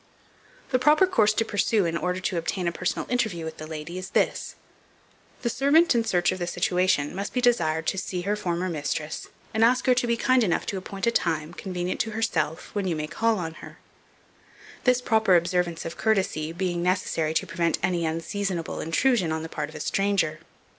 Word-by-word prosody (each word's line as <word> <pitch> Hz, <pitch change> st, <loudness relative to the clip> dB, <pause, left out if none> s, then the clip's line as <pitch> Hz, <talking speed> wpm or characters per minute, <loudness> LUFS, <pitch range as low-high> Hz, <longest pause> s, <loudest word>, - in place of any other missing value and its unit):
The 255 Hz, -, +3 dB
proper 300 Hz, +7 st, +5 dB
course 220 Hz, -, +3 dB
to 225 Hz, -, 0 dB
pursue 210 Hz, -1 st, +1 dB
in 165 Hz, 0 st, -1 dB
order 180 Hz, +3 st, -1 dB
to 180 Hz, -1 st, -1 dB
obtain 175 Hz, +2 st, -2 dB
a -, -, +1 dB
personal 180 Hz, +1 st, -2 dB
interview 215 Hz, -10 st, -1 dB
with 160 Hz, 0 st, -6 dB
the 155 Hz, -, -7 dB
lady 160 Hz, +3 st, -6 dB
is 185 Hz, 0 st, -7 dB
this: -, -, 0 dB, 0.9 s
The 235 Hz, -, +1 dB
servant 300 Hz, +6 st, +4 dB
in 235 Hz, -1 st, +2 dB
search 175 Hz, -5 st, +2 dB
of 185 Hz, -, -4 dB
the 175 Hz, -, -2 dB
situation 180 Hz, -4 st, +1 dB
must 200 Hz, +2 st, -4 dB
be 250 Hz, -, +1 dB
desired 165 Hz, -11 st, +2 dB
to 190 Hz, -, 0 dB
see 180 Hz, -1 st, -3 dB
her 200 Hz, +3 st, 0 dB
former 180 Hz, -3 st, -2 dB
mistress, 155 Hz, -1 st, -3 dB, 0.3 s
and 220 Hz, +1 st, +2 dB
ask 250 Hz, +2 st, +4 dB
her 255 Hz, -, +5 dB
to 245 Hz, -1 st, 0 dB
be 235 Hz, 0 st, +1 dB
kind 255 Hz, 0 st, +3 dB
enough 175 Hz, -6 st, 0 dB
to 195 Hz, -, -3 dB
appoint 195 Hz, +2 st, -5 dB
a 235 Hz, -, +3 dB
time, 160 Hz, -6 st, -1 dB
convenient 180 Hz, -1 st, -4 dB
to 220 Hz, -, -1 dB
herself, 215 Hz, -8 st, -1 dB
when 200 Hz, -2 st, -1 dB
you 170 Hz, -, 0 dB
may 150 Hz, 0 st, -2 dB
call 225 Hz, +7 st, +1 dB
on 165 Hz, -3 st, -4 dB
her; -, -, -11 dB, 1.1 s
this 250 Hz, -1 st, +3 dB
proper 220 Hz, -6 st, +4 dB
observance 175 Hz, -1 st, 0 dB
of 165 Hz, +1 st, -6 dB
courtesy 190 Hz, -8 st, 0 dB
being 175 Hz, 0 st, -2 dB
necessary 170 Hz, -3 st, 0 dB
to 195 Hz, -, +1 dB
prevent 170 Hz, -2 st, 0 dB
any 175 Hz, -2 st, +1 dB
unseasonable 165 Hz, +2 st, -2 dB
intrusion 180 Hz, +2 st, +2 dB
on 160 Hz, 0 st, -2 dB
the 160 Hz, -, -6 dB
part 150 Hz, -2 st, -4 dB
of 155 Hz, -, -13 dB
a -, -, -6 dB
stranger. 195 Hz, -3 st, 0 dB
185 Hz, 200 wpm, -26 LUFS, 165-220 Hz, 1.1 s, proper